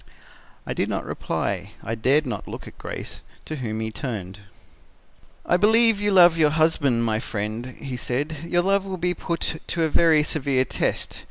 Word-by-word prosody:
"I - - -3
did - - -1
not - - -2
reply. 95 +1 -3
I 110 - -3
dared 135 +7 +2
not 125 - -5
look - - -8
at - - -13
Grace, - - -7 0.2
to 155 - -5
whom 110 -4 -3
he 110 0 -3
turned. 105 -6 -5 1.1
"'I 175 - +3
believe 220 +1 +4
you 205 - +2
love 175 -3 +6
your 155 -2 +5
husband, 150 -6 +2
my 110 -1 +1
friend,' 110 +3 -4
he 135 -3 -5
said; 145 +6 -2
'your 175 +1 +1
love 195 +1 +2
will 190 -1 -5
be 180 +1 0
put 165 -2 -3
to 170 - -1
a 160 - +2
very 160 -1 +4
severe 140 -4 0
test. - - -2
150 Hz, 180 wpm, -24 LUFS, 115-170 Hz, 1.1 s, love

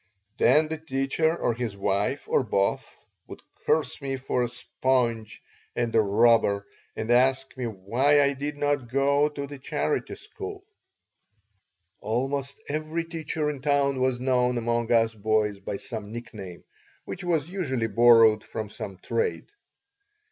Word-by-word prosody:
Then 150 +5 +4
the 160 0 -4
teacher 160 +2 0
or 120 - 0
his 115 -3 -4
wife, 100 +7 0
or - - +3
both, 100 -4 0 0.4
would - - -11 0.2
curse 155 -1 +1
me 135 -1 -3
for 130 -1 -1
a 120 - +1
sponge 120 -2 -1 0.3
and 120 -1 -1
a 110 - +6
robber, 105 -1 +3 0.3
and 110 +2 -2
ask 130 +2 +3
me 130 -2 -4
why 115 +8 +2
I 140 0 +2
did 145 +2 -5
not 145 -4 0
go 140 +3 +2
to 145 -1 -5
the 140 0 -9
charity 130 - -2
school 405 -1 -8 1.3
Almost 135 +5 -2
every 155 +3 -2
teacher 160 -2 -3
in 140 -3 -8
town 140 -1 +2
was 130 -1 +1
known 125 -1 +1
among 120 0 -1
us 115 -1 +3
boys 105 -1 0
by 100 0 -4
some 110 -3 -7
nickname, 105 -7 -8 0.4
which 185 - -6
was 170 -2 0
usually 135 -12 -1
borrowed 115 -1 +6
from 110 -2 -6
some 95 -3 -7
trade. 455 - -2
125 Hz, 145 wpm, -26 LUFS, 115-145 Hz, 1.3 s, a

